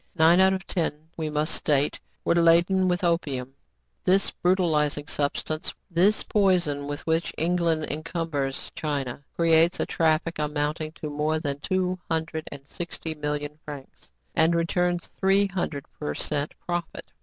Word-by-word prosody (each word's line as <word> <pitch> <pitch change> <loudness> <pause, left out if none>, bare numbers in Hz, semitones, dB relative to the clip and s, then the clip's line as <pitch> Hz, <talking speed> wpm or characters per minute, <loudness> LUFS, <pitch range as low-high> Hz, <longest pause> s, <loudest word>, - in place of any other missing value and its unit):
Nine 165 +2 +6
out 190 0 +6
of 190 0 -4
ten, 160 -3 -2
we 160 -2 -3
must 150 +1 0
state, 145 -1 +1 0.3
were - - +4
laden 170 +3 +4
with 180 0 0
opium. 140 -7 0 0.5
This 195 +2 +3
brutalizing 155 -5 +1
substance, 150 +2 -2 0.2
this 185 +5 +3
poison 175 -9 +2
with 145 0 -5
which 165 +1 +1
England 165 -1 +1
encum 165 +2 -3
bers 135 -2 -2
China, 140 -4 -3
creates 165 0 +4
a - - +1
traffic 160 0 +1
amounting 150 +1 -1
to 150 -2 -6
more 150 +2 0
than 145 -3 -3
two 185 +3 -1
hundred 160 -1 -2
and 140 -1 -9
sixty 170 -1 -5
million 150 0 -3
francs, 145 - -10 0.2
and 165 +1 +4
returns 175 +1 +1
three 195 +1 +2
hundred 175 -7 -3
per 75 0 -3
cent 145 -1 -2
profit. 175 -1 -4
160 Hz, 145 wpm, -26 LUFS, 150-175 Hz, 0.5 s, Nine